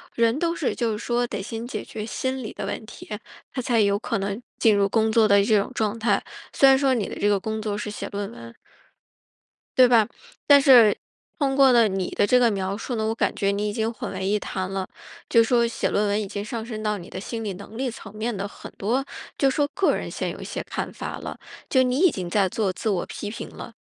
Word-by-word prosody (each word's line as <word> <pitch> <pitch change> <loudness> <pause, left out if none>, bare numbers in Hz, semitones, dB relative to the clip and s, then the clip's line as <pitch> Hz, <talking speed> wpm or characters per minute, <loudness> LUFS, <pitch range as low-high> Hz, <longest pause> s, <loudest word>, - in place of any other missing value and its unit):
人 230 +2 +2
都 335 +1 0
是 295 - -1
就 235 -3 0
是 210 - -2
说 240 +1 0
得 235 - -4
先 225 +3 -5
解 265 - -4
决 215 -1 -6
心 260 +3 -3
理 215 - -6
的 200 - -5
问 210 +2 -4
题， 230 - -12 0.4
他 260 - -3
才 240 -3 +2
有 200 0 +3
可 205 - -2
能 200 +4 -3 0.2
进 220 -2 +5
入 200 0 +3
工 220 +1 +2
作 220 -1 +5
的 200 -1 +5
这 210 0 +4
种 200 - -3
状 215 0 -1
态， 230 +1 +1 0.3
虽 275 - +6
然 265 - +6
说 270 -1 +2
你 225 -6 -1
的 - - -6
这 205 - 0
个 205 -1 +3
工 220 +2 -3
作 210 -1 -2
是 210 +1 -4
写 210 - -5
论 200 +1 -4
文。 115 - -11 1.2
对 255 -1 +8
吧， 230 -3 +5 0.4
但 285 -1 +7
是 245 -7 +7 0.4
通 275 -2 +1
过 270 -1 +6
了 235 -3 +5
你 190 -2 -2
的 - - +2
这 250 - +5
个 235 -2 +4
描 195 0 -2
述 240 +2 -4
呢， 220 0 -1
我 225 - -1
感 - - 0
觉 200 - +1
你 205 +1 0
已 205 - -2
经 225 0 -1
混 225 - -6
为 190 0 -3
一 210 +1 +2
谈 185 -2 -4
了， 190 -1 -3 0.4
就 230 - +6
是 225 - +2
说 235 -2 +4
写 230 - -1
论 205 0 +1
文 205 +1 +1
已 205 - -4
经 205 +1 -5
上 225 0 -4
升 220 -2 -6
到 210 -1 0
你 175 - -11
的 - - -6
心 225 +3 -5
理 205 - -3
能 200 +4 -11
力 260 +2 -1
层 220 -3 -10
面 220 +1 -2
的 195 +1 -3
很 - - -11
多 240 +7 0 0.3
就 275 - +3
是 265 - -2
说 290 -1 +2
个 390 0 +2
人 - - -4
现 - - -3
有 - - -7
一 - - -7
些 - - -4
看 - - -4
法 - - -5
了， - - -7 0.3
就 260 - +4
你 255 +1 +1
已 370 - +6
经 180 -6 -5
在 195 0 +2
做 195 0 -1
自 220 - -5
我 190 -4 0
批 205 - -6
评 - - -7
了。 - - -10
220 Hz, 280 characters per minute, -24 LUFS, 200-245 Hz, 1.2 s, 对